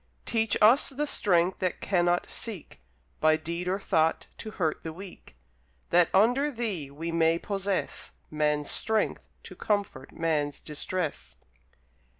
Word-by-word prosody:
Teach 225 Hz, -2 st, +1 dB
us 235 Hz, +7 st, +6 dB
the 285 Hz, +2 st, -2 dB
Strength 185 Hz, -, +2 dB
that 185 Hz, -1 st, -1 dB
cannot 175 Hz, -2 st, +1 dB
seek, 210 Hz, -9 st, -6 dB, 0.4 s
By 155 Hz, 0 st, +4 dB
deed 170 Hz, +3 st, -4 dB
or 185 Hz, +1 st, +1 dB
thought, 160 Hz, -5 st, +1 dB
to 220 Hz, -, -6 dB
hurt 160 Hz, -4 st, 0 dB
the 160 Hz, -, -5 dB
weak; 185 Hz, -, -11 dB, 0.6 s
That, 175 Hz, -1 st, +5 dB
under 245 Hz, +9 st, +4 dB
Thee, 215 Hz, -, -3 dB
we 160 Hz, +4 st, -5 dB
may 165 Hz, 0 st, +3 dB
possess 195 Hz, +1 st, -3 dB, 0.2 s
Man's 150 Hz, -1 st, 0 dB
strength 220 Hz, -1 st, -1 dB, 0.2 s
to -, -, -11 dB
comfort 200 Hz, -11 st, -2 dB
man's 150 Hz, -3 st, -1 dB
distress. 160 Hz, +2 st, -4 dB
175 Hz, 135 wpm, -28 LUFS, 160-205 Hz, 0.6 s, us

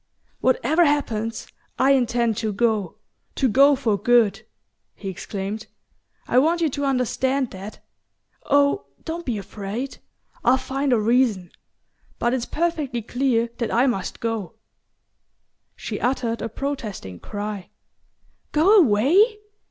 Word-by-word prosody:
"Whatever 270 Hz, +6 st, +3 dB
happens, 230 Hz, -7 st, 0 dB, 0.3 s
I 265 Hz, +1 st, +4 dB
intend 240 Hz, -3 st, +2 dB
to 220 Hz, -2 st, -1 dB
go 210 Hz, -3 st, 0 dB, 0.4 s
to 265 Hz, -, +2 dB
go 275 Hz, +5 st, +5 dB
for 225 Hz, -7 st, 0 dB
good," 220 Hz, -1 st, +3 dB, 0.5 s
he 195 Hz, -, -6 dB
exclaimed. 200 Hz, +3 st, -5 dB, 0.6 s
"I 250 Hz, -, +4 dB
want 330 Hz, +5 st, +2 dB
you 325 Hz, -2 st, +2 dB
to 285 Hz, +2 st, -2 dB
understand 260 Hz, 0 st, 0 dB
that. 195 Hz, +3 st, -10 dB, 0.6 s
Oh, 285 Hz, +6 st, +3 dB, 0.2 s
don't 335 Hz, 0 st, -5 dB
be 235 Hz, -4 st, -1 dB
afraid 205 Hz, +6 st, -6 dB, 0.4 s
I'll 250 Hz, +2 st, +5 dB
find 270 Hz, +1 st, -2 dB
a 240 Hz, -, +4 dB
reason. 215 Hz, -5 st, +1 dB, 0.7 s
But 240 Hz, +1 st, 0 dB
it's 250 Hz, -2 st, -2 dB
perfectly 300 Hz, -8 st, -1 dB
clear 240 Hz, -1 st, 0 dB
that 230 Hz, -3 st, -1 dB
I 245 Hz, +3 st, +3 dB
must 215 Hz, -8 st, -2 dB
go." 225 Hz, -3 st, -3 dB, 1.2 s
She -, -, -5 dB
uttered 240 Hz, -2 st, -1 dB
a 230 Hz, -, -3 dB
protesting 215 Hz, -, -5 dB
cry. 205 Hz, -2 st, -6 dB, 0.8 s
"Go 340 Hz, +8 st, +5 dB
away? 340 Hz, -, +4 dB
240 Hz, 125 wpm, -23 LUFS, 215-275 Hz, 1.2 s, go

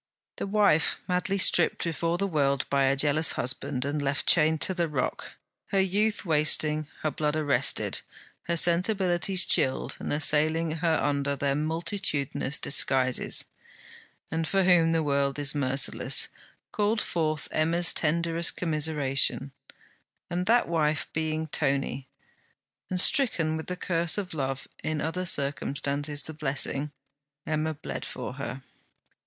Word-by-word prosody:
The -, -, -4 dB
wife 200 Hz, -6 st, +3 dB
madly 180 Hz, +2 st, 0 dB
stripped 190 Hz, -, +4 dB
before 165 Hz, +1 st, -1 dB
the 200 Hz, -, -1 dB
world 140 Hz, -6 st, 0 dB
by 140 Hz, -1 st, +3 dB
a 135 Hz, +1 st, +2 dB
jealous 150 Hz, +3 st, +4 dB
husband, 130 Hz, +1 st, -2 dB
and 145 Hz, +1 st, -2 dB
left 140 Hz, 0 st, -1 dB
chained 160 Hz, -1 st, +3 dB
to 190 Hz, -, +3 dB
the 175 Hz, -2 st, -1 dB
rock, 135 Hz, -4 st, -3 dB, 0.3 s
her 195 Hz, -, 0 dB
youth 205 Hz, +3 st, 0 dB
wasting, 155 Hz, -1 st, +1 dB, 0.2 s
her 155 Hz, -, 0 dB
blood 150 Hz, +2 st, -1 dB
arrested, 150 Hz, -3 st, +1 dB, 0.5 s
her 170 Hz, 0 st, 0 dB
sensibilities 180 Hz, +1 st, +2 dB
chilled 130 Hz, -, +2 dB
and -, -, -5 dB
assailing 155 Hz, +2 st, +2 dB
her 165 Hz, 0 st, +1 dB
under 140 Hz, 0 st, -1 dB
their 140 Hz, 0 st, -1 dB
multitudinous 150 Hz, -2 st, -1 dB
disguises, 130 Hz, -2 st, 0 dB, 0.9 s
and 160 Hz, 0 st, -2 dB
for 195 Hz, -1 st, +1 dB
whom 175 Hz, -3 st, +4 dB
the 165 Hz, -1 st, +1 dB
world 140 Hz, -1 st, 0 dB
is 145 Hz, -1 st, 0 dB
merciless, 140 Hz, -2 st, +1 dB, 0.4 s
called 210 Hz, +1 st, 0 dB
forth 155 Hz, -5 st, -2 dB
Emma's 165 Hz, +2 st, +2 dB
tenderest 165 Hz, +1 st, +1 dB
commiseration; 150 Hz, -4 st, +1 dB, 0.8 s
and 180 Hz, +1 st, -2 dB
that 235 Hz, +2 st, +3 dB
wife 155 Hz, -2 st, 0 dB
being 160 Hz, 0 st, -2 dB
Tony, 135 Hz, -3 st, -2 dB, 0.8 s
and 185 Hz, -, -2 dB
stricken 175 Hz, -, +2 dB
with 160 Hz, -, -6 dB
the 180 Hz, -, -4 dB
curse 170 Hz, -1 st, 0 dB
of 195 Hz, -4 st, -4 dB
love, 135 Hz, -3 st, -4 dB, 0.2 s
in 155 Hz, -1 st, -2 dB
other 180 Hz, +4 st, -2 dB
circumstances 145 Hz, 0 st, -1 dB
the 160 Hz, -, -5 dB
blessing, 145 Hz, -1 st, -2 dB, 0.5 s
Emma 155 Hz, 0 st, -2 dB
bled 145 Hz, -, -7 dB
for -, -, -6 dB
her. 130 Hz, -1 st, -7 dB
155 Hz, 135 wpm, -27 LUFS, 140-170 Hz, 0.9 s, stripped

